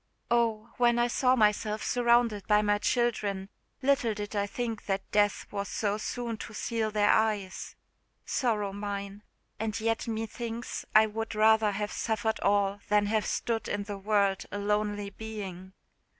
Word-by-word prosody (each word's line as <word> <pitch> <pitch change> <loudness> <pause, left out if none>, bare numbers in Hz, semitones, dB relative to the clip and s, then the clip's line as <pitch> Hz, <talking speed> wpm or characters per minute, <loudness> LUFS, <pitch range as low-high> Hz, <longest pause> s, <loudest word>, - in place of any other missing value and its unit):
Oh! 230 -1 +1
when 240 -1 +4
I 240 - +3
saw 255 +1 +3
myself 215 -1 +1
surrounded 235 -4 +2
by 210 0 +4
my 205 0 +2
children, 205 -5 0 0.3
little 265 -5 +2
did 205 0 -5
I 200 0 +1
think 230 0 -4
that 195 -1 -2
death 205 -1 +2
was 200 -1 -3
so 210 -1 -1
soon 235 0 -3
to 215 - -8
seal 225 -1 -1
their 210 -1 +3
eyes! 210 -4 0 0.5
Sorrow 210 -6 0
mine! 200 0 -5 0.4
and 220 0 -2
yet 225 +1 -1
me 225 0 -2
thinks 235 +1 -5
I 215 0 +8
would 220 +1 -4
rather 220 0 +5
have 205 +1 -3
suffered 220 0 -1
all 200 0 +2
than 210 0 +4
have 215 0 0
stood 230 -1 -1
in 205 0 -2
the 200 -1 -6
world 200 -1 +1
a - - -3
lonely 205 0 -1
being. 195 -4 -7
215 Hz, 160 wpm, -29 LUFS, 205-225 Hz, 0.5 s, I